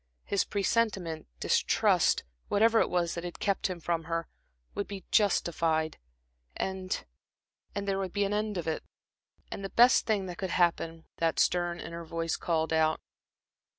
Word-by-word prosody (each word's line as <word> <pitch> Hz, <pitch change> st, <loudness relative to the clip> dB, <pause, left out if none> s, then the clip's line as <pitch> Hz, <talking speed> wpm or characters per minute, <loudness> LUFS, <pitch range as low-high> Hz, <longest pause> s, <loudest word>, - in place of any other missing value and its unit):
His 200 Hz, -, 0 dB
presentiment, 195 Hz, -5 st, 0 dB
distrust -, -, +3 dB, 0.2 s
whatever 225 Hz, +2 st, +4 dB
it -, -, +2 dB
was 175 Hz, -2 st, 0 dB
that 170 Hz, -, -5 dB
had 175 Hz, -1 st, -6 dB
kept 200 Hz, -2 st, 0 dB
him 185 Hz, -2 st, -5 dB
from 165 Hz, -1 st, -1 dB
her 165 Hz, 0 st, -2 dB, 0.5 s
would 205 Hz, -, -3 dB
be 200 Hz, -2 st, -7 dB
justified, 165 Hz, -6 st, +2 dB, 0.6 s
and 190 Hz, -1 st, -3 dB, 0.7 s
and 200 Hz, 0 st, -3 dB
there 195 Hz, -1 st, 0 dB
would 190 Hz, -2 st, -3 dB
be 205 Hz, +1 st, +1 dB
the 205 Hz, -, -1 dB
end 210 Hz, -1 st, -1 dB
of 170 Hz, -, -3 dB
it. 160 Hz, -, -1 dB, 0.7 s
And 195 Hz, -, -5 dB
the 195 Hz, -, -3 dB
best 245 Hz, +5 st, +5 dB
thing 210 Hz, -4 st, +1 dB
that 175 Hz, -1 st, -7 dB
could 190 Hz, -, -2 dB
happen, 165 Hz, -2 st, +1 dB
that 165 Hz, -1 st, +1 dB
stern 175 Hz, -1 st, +2 dB
inner 170 Hz, +1 st, -6 dB
voice 165 Hz, 0 st, -2 dB
called 160 Hz, -1 st, 0 dB
out. 160 Hz, 0 st, +3 dB
175 Hz, 160 wpm, -30 LUFS, 165-200 Hz, 0.7 s, best